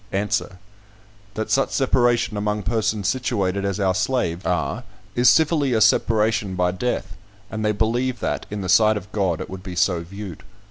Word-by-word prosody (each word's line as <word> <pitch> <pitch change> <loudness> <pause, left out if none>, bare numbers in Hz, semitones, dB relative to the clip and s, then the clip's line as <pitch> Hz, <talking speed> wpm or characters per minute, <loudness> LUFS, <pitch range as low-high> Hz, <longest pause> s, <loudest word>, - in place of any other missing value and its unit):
Answer: 95 -2 -1 0.8
"That 110 - -3
such 135 - +2
separation 120 -4 +1
among 105 0 -1
persons 105 0 0
situated 100 -5 -1
as 100 0 -2
our 95 -2 +2
slaves 95 -4 -1
are, - - -1 0.3
is 120 +1 +5
civilly 150 -4 +3
a 110 - +2
separation 110 -3 +2
by 90 0 +1
death; 95 -2 -3 0.4
and 110 0 -3
they 105 - +2
believe 120 +4 0
that, - - -3
in 105 0 -4
the 95 - -4
sight 110 +3 +5
of 100 +1 -9
God, 95 -6 0
it 95 - -5
would 95 -1 -8
be 90 -1 -7
so 90 0 +2
viewed. 95 0 -8
105 Hz, 175 wpm, -22 LUFS, 95-115 Hz, 0.8 s, is